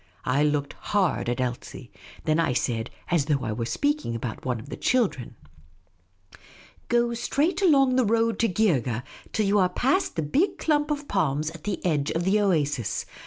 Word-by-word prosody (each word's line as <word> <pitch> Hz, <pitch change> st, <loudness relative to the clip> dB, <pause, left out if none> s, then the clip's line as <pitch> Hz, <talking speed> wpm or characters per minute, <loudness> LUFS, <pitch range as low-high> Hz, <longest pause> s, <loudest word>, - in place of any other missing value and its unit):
I 130 Hz, +3 st, +2 dB
looked 145 Hz, -1 st, 0 dB
hard 190 Hz, -11 st, 0 dB
at 120 Hz, -, -2 dB
Elsie, 125 Hz, 0 st, -4 dB, 0.3 s
then 155 Hz, 0 st, +2 dB
I 160 Hz, -6 st, +2 dB
said, 120 Hz, -1 st, -1 dB, 0.2 s
as 165 Hz, -5 st, +2 dB
though 145 Hz, -4 st, 0 dB
I 110 Hz, -, -2 dB
were 115 Hz, +1 st, -3 dB
speaking 290 Hz, -, -1 dB
about 115 Hz, -1 st, -5 dB
one 125 Hz, -2 st, -2 dB
of 130 Hz, +6 st, -11 dB
the -, -, -5 dB
children: 200 Hz, -, 0 dB, 0.8 s
" -, -, -42 dB, 0.7 s
Go 240 Hz, 0 st, +2 dB
straight 285 Hz, -, 0 dB
along 275 Hz, -8 st, +4 dB
the 255 Hz, -, +3 dB
road 230 Hz, +1 st, +1 dB
to 230 Hz, -, +3 dB
Geergeh 135 Hz, -, +1 dB, 0.3 s
till 215 Hz, -, 0 dB
you 200 Hz, +1 st, +3 dB
are 185 Hz, -1 st, +3 dB
past 270 Hz, -, 0 dB
the 160 Hz, -, -1 dB
big 305 Hz, -, +1 dB
clump 300 Hz, -1 st, +1 dB
of 295 Hz, -1 st, -3 dB
palms 155 Hz, -5 st, 0 dB
at 165 Hz, -2 st, -12 dB
the 210 Hz, -, -3 dB
edge 150 Hz, -4 st, +1 dB
of 165 Hz, -, -1 dB
the 195 Hz, +4 st, +3 dB
oasis. 145 Hz, -, 0 dB
170 Hz, 185 wpm, -26 LUFS, -, 0.8 s, along